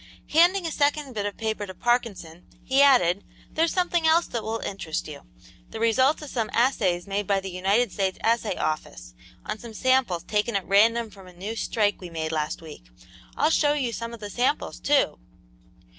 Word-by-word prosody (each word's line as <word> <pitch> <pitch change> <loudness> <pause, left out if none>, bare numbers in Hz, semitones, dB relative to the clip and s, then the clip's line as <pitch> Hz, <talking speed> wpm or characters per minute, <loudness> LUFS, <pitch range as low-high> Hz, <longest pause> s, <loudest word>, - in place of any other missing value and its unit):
Handing 350 +4 +4
a 330 - -2
second 290 -2 0
bit 205 -2 -2
of 205 - -7
paper 220 -2 -3
to 185 - -9
Parkinson, 200 -9 -2 0.2
he 265 +1 +3
added: 205 -10 +4 0.3
"There's 325 +1 +1
something 350 -3 +1
else 330 +2 +4
that 235 - -4
will 220 +1 -3
interest 170 -5 -4
you; 150 - -10 0.4
the - - -7
results 260 +7 +2
of 295 - -8
some 225 -3 -2
assays 200 -8 +1
made 200 0 -3
by 200 -1 +2
the 190 0 -7
United 195 +5 +1
States 190 -1 -1
Assay 230 -1 +1
Office - - -4 0.3
on 215 0 -4
some 230 -2 -10
samples 255 -10 +1
taken 210 +4 -1
at 195 -2 -1
random 225 +3 +3
from 195 -2 -14
a 180 - -14
new 200 +6 -6
strike 210 -3 0
we 180 - -7
made 160 -1 -4
last 155 +1 -2
week. 155 - -11 0.5
I'll 310 - +3
show 295 -2 +3
you 260 -6 -1
some 230 0 -5
of 235 - -9
the 205 -1 -7
samples, 250 +6 -1
too." 280 - +2
220 Hz, 190 wpm, -25 LUFS, 185-260 Hz, 0.5 s, Handing